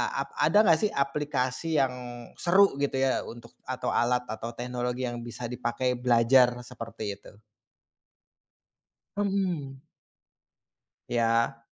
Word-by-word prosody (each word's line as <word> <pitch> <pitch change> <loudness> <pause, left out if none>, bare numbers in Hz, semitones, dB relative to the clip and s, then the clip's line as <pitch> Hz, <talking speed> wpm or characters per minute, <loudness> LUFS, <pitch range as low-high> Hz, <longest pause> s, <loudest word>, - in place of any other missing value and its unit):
ap - - -2
ada 210 +1 +5
enggak 165 -6 +5
sih, 210 - 0
aplikasi 140 +1 0
yang 135 -1 +1 0.5
seru 190 -3 +4
gitu 140 0 0
ya, 135 -1 +1
untuk 120 0 -11 0.2
atau 130 0 -2
alat 125 +1 +2
atau 115 +2 -5
teknologi 125 +1 -3
yang 120 0 -5
bisa 120 +1 -7
dipakai 125 +1 -1
belajar 125 +1 +5
seperti 115 -4 -6
itu? 100 - -16 1.8
Mhm. 180 -10 -1 1.2
Ya. 115 0 +1
125 Hz, 110 wpm, -28 LUFS, 120-140 Hz, 1.8 s, ada